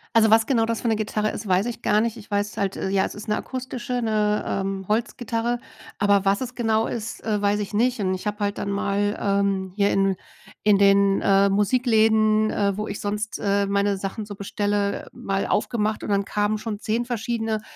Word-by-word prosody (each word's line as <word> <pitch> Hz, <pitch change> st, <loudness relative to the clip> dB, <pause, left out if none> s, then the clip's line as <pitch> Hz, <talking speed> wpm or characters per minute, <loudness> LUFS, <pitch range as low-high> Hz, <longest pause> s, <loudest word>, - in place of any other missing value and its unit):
Also, 220 Hz, -1 st, +6 dB
was 225 Hz, +1 st, +5 dB
genau 230 Hz, -3 st, +2 dB
das 230 Hz, 0 st, -2 dB
für 235 Hz, -, 0 dB
'ne 220 Hz, -, +1 dB
Gitarre 215 Hz, 0 st, -1 dB
ist, 210 Hz, -, -6 dB
weiß 190 Hz, +3 st, +2 dB
ich 240 Hz, -, -5 dB
gar 210 Hz, +1 st, +3 dB
nicht. 230 Hz, 0 st, -2 dB
Ich 210 Hz, -, -12 dB
weiß 205 Hz, 0 st, -1 dB
halt 195 Hz, -1 st, -1 dB
äh, -, -, -3 dB
ja, 195 Hz, 0 st, +2 dB
es -, -, -6 dB
ist 210 Hz, +1 st, -8 dB
'ne 210 Hz, -, +1 dB
akustische, 250 Hz, -1 st, -4 dB
'ne, 210 Hz, -2 st, +1 dB
ähm, 195 Hz, 0 st, -2 dB
Holzgitarre. 235 Hz, +1 st, -1 dB, 0.4 s
Aber 200 Hz, -1 st, +3 dB
was 195 Hz, +3 st, +2 dB
es 255 Hz, -1 st, -4 dB
genau 225 Hz, -2 st, +1 dB
ist, 230 Hz, -1 st, -5 dB
äh, 210 Hz, -2 st, -1 dB
weiß 205 Hz, +1 st, +1 dB
ich 205 Hz, -, -6 dB
nicht. 240 Hz, +2 st, +1 dB
Und 185 Hz, -1 st, 0 dB
ich 185 Hz, +3 st, -4 dB
habe 210 Hz, +1 st, -3 dB
halt 205 Hz, 0 st, -1 dB
dann -, -, -3 dB
mal, 200 Hz, +1 st, 0 dB
ähm, 195 Hz, -2 st, 0 dB
hier 200 Hz, 0 st, +3 dB
in 195 Hz, -1 st, +2 dB, 0.5 s
in 210 Hz, -2 st, +5 dB
den, 200 Hz, 0 st, +4 dB
äh, 195 Hz, 0 st, +4 dB
Musikläden, 215 Hz, 0 st, +3 dB
äh, 200 Hz, -1 st, 0 dB
wo 215 Hz, -, -3 dB
ich 200 Hz, -, -5 dB
sonst, 210 Hz, +1 st, -3 dB
äh, 200 Hz, 0 st, +1 dB
meine 200 Hz, 0 st, +1 dB
Sachen 195 Hz, +3 st, -5 dB
so 205 Hz, 0 st, -8 dB
bestelle, 205 Hz, 0 st, -1 dB
äh, -, -, -14 dB
mal 195 Hz, 0 st, -2 dB
aufgemacht 215 Hz, -1 st, 0 dB
und -, -, -5 dB
dann 200 Hz, 0 st, +1 dB
kamen 210 Hz, +1 st, 0 dB
schon 215 Hz, -1 st, -4 dB
10 230 Hz, +2 st, -1 dB
verschiedene, 225 Hz, -2 st, -2 dB
210 Hz, 215 wpm, -24 LUFS, 200-225 Hz, 0.5 s, Also